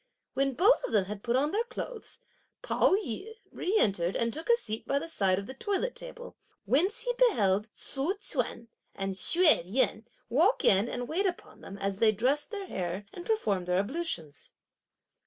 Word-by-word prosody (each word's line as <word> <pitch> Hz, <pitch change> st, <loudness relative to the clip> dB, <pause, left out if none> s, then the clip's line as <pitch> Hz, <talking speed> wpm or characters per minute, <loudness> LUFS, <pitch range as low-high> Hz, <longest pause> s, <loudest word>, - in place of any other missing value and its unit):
When 275 Hz, -1 st, 0 dB
both 400 Hz, -, +4 dB
of -, -, -4 dB
them 205 Hz, -3 st, +3 dB
had 205 Hz, +1 st, -6 dB
put 235 Hz, +2 st, 0 dB
on 290 Hz, +4 st, +2 dB
their 435 Hz, +3 st, +1 dB
clothes, 480 Hz, -1 st, -7 dB, 0.5 s
Pao -, -, +3 dB
yü 400 Hz, -, -4 dB, 0.2 s
re 395 Hz, +5 st, 0 dB
entered 190 Hz, -, +2 dB
and 230 Hz, -1 st, 0 dB
took 320 Hz, +6 st, -7 dB
a 470 Hz, -, +7 dB
seat 220 Hz, -, -5 dB
by 275 Hz, -, +1 dB
the 280 Hz, -, -3 dB
side 195 Hz, -, +1 dB
of 200 Hz, -, -4 dB
the 260 Hz, -, -8 dB
toilet 410 Hz, -, -2 dB
table; -, -, -9 dB, 0.3 s
whence 355 Hz, -, +2 dB
he -, -, -1 dB
beheld 210 Hz, -, +3 dB
Tzu 285 Hz, +8 st, -2 dB
chüan 250 Hz, -, -3 dB, 0.3 s
and 195 Hz, 0 st, -2 dB
Hsüeh 330 Hz, -, +4 dB
Yen 220 Hz, +3 st, 0 dB, 0.2 s
walk 335 Hz, -, +2 dB
in 200 Hz, +4 st, +4 dB
and 245 Hz, 0 st, -4 dB
wait 380 Hz, +8 st, +1 dB
upon 355 Hz, -, -6 dB
them, 195 Hz, -, -9 dB
as 195 Hz, 0 st, -3 dB
they 220 Hz, -1 st, +5 dB
dressed 260 Hz, +8 st, 0 dB
their 405 Hz, -3 st, -5 dB
hair 185 Hz, -, -4 dB
and 350 Hz, -, -8 dB
performed 205 Hz, -, 0 dB
their 180 Hz, 0 st, +2 dB
ablutions. 200 Hz, -, -4 dB
260 Hz, 185 wpm, -29 LUFS, -, 0.5 s, a